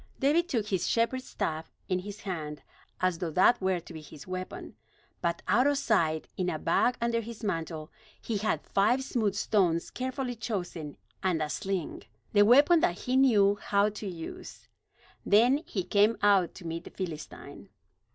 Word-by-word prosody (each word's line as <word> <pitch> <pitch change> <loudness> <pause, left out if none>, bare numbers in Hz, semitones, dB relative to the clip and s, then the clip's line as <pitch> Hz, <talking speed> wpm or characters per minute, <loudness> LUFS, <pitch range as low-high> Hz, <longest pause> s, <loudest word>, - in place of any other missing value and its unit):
David 325 +6 +2
took 225 -5 0
his 190 -3 0
shepherd's 255 +3 0
staff 160 +1 -3 0.2
in 185 -1 0
his 205 +2 -8
hand, 155 -6 -5 0.4
as 185 -2 +1
though 175 - -2
that 185 +8 +4
were 190 -1 +1
to 170 - -12
be 160 - -8
his 150 -1 -12
weapon. 185 0 -6 0.5
But 170 0 -1
out 235 +8 +4
of 285 -1 +2
sight, 165 - +1
in 180 -1 0
a 155 - -2
bag 205 +10 +1
under 235 -1 0
his 230 0 -9
mantle, 165 -5 -3 0.3
he 225 - -3
had 215 +2 -1
five 240 +7 +2
smooth 220 -7 -1
stones 180 -6 +1
carefully 255 0 -3
chosen, 175 -9 -5 0.2
and 180 -4 +1
a 155 -1 -2
sling, 190 -4 -3 0.3
the 205 - +6
weapon 285 +10 +6
that 175 - 0
he 250 - -1
knew 205 -7 +4
how 200 +1 +2
to 210 0 -7
use. 170 -3 -8 0.6
Then 235 +7 +5
he 190 - -2
came 205 +4 +3
out 195 -4 +4
to 180 - -11
meet 165 0 -4
the - - -8
Philistine. 165 -5 -8
200 Hz, 170 wpm, -29 LUFS, 170-230 Hz, 0.6 s, the